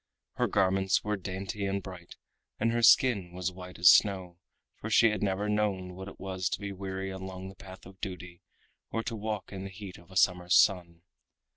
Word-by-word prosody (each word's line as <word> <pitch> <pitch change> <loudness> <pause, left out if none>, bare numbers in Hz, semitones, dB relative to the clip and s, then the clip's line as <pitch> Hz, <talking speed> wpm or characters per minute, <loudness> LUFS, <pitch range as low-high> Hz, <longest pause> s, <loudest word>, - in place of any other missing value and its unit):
Her - - 0
garments 95 0 +2
were 105 0 -1
dainty 95 +1 -5
and 100 0 -2
bright, 90 -2 -10 0.4
and 115 +2 +2
her 120 0 0
skin 105 -7 +5
was 90 +1 -2
white 90 0 -10
as 90 0 +7
snow, 95 -4 +3 0.4
for - - -5
she 115 - +5
had 105 - -3
never 100 +1 0
known 100 -4 -1
what 95 +1 -8
it - - -11
was 95 -1 -2
to - - -3
be 100 -1 -5
weary 95 0 -5
along 95 0 -7
the 95 - -13
path 95 -1 -12
of 95 +1 -15
duty 90 -2 -7 0.5
or 115 - -2
to 115 - -4
walk 105 -2 -4
in 95 -1 -6
the 95 - -6
heat 95 -1 -10
of 85 - -19
a 95 - -6
summer's 90 -1 +3
sun. 85 -4 +3
95 Hz, 200 wpm, -29 LUFS, 90-100 Hz, 0.5 s, as